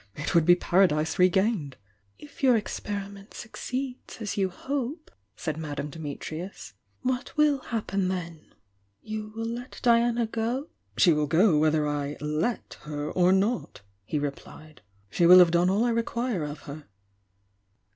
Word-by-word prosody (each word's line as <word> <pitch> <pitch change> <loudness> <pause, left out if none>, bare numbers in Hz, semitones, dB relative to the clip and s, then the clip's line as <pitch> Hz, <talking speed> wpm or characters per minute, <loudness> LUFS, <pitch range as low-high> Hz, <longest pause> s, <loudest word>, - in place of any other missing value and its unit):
— - - -39
it - - -2
would 170 -3 +4
be 175 +1 +7
Paradise 175 -2 +2
regained! 185 - +2 0.4
"If 295 -1 -14
your 255 -4 +5
experiment 200 -1 -6
succeeds 255 +2 -6
as 215 -3 -3
you 195 -2 +1
hope," 280 - -4 0.2
said 155 -2 -4
Madame 150 -2 -5
Dimitrius, 160 - -7 0.3
"what 255 +2 -2
will 300 -2 +4
happen 200 -6 -2
then? 170 -4 -5 0.5
You 215 0 -5
will 225 0 -3
let 240 +2 -6
Diana 235 0 +3
go?" 230 +6 -2 0.3
"She 175 - +6
will 150 -1 0
go 165 +4 +4
whether 155 -1 +2
I 145 0 -3
'let' 150 +10 -2
her 150 0 -5
or 180 0 +3
not, 195 - 0 0.2
he 150 - -3
re 145 -1 0
plied. 155 +2 -15 0.3
"She 170 - +3
will 180 +1 +10
have 175 -2 +7
done 175 +1 +3
all 200 +4 +2
I 240 - +2
require 230 -5 -1
of 150 +1 -7
her." 145 +1 -9
190 Hz, 155 wpm, -27 LUFS, 155-230 Hz, 0.5 s, will